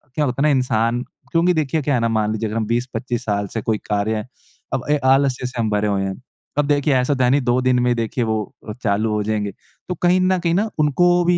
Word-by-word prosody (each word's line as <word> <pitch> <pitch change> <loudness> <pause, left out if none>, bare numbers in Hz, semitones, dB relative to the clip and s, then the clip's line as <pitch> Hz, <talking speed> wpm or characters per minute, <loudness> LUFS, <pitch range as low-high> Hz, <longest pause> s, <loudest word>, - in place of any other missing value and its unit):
क्या 150 - +1
होता 125 0 -2
है 150 - +4
ना - - +4
इंसान 120 -1 +1 0.3
क्योंकि 170 +2 +3
देखिए 155 -1 0
क्या 145 0 0
है - - +2
ना 115 - +1
मान 110 -1 +1
लीजिए 110 +1 -2
अगर 110 - -3
हम 110 - 0
20-25 120 +1 -2
साल 100 -1 -1
से 110 - -2
कोई 110 0 0
कार्य 105 +1 0
है 105 +2 -4 0.5
अब 130 -2 -1
अ, 150 - +4
आलस्य 135 -1 +3
से 125 -1 -7
हम 110 -2 +1
भरे 105 0 +1
हुए 100 -1 0
हैं। 95 +4 -4 0.4
अब 145 - +3
देखिए 145 0 +2
ऐसा 125 +3 +2
तो 130 - +1
है 125 - +4
नहीं 140 +3 +3
दो 125 0 +2
दिन 130 -1 +2
में 125 0 +2
देखिए 115 +1 -1
वो 110 -1 0 0.3
अ, - - -3
चालू 110 0 +1
हो 105 0 0
जाएँगे। 105 -1 -1 0.4
तो 180 - -1
कहीं 180 +1 +3
न 185 0 +3
कहीं 170 -1 0
न 205 +4 +2
उनको 175 +4 +3
भी 175 0 +3
125 Hz, 265 wpm, -20 LUFS, 110-145 Hz, 0.5 s, है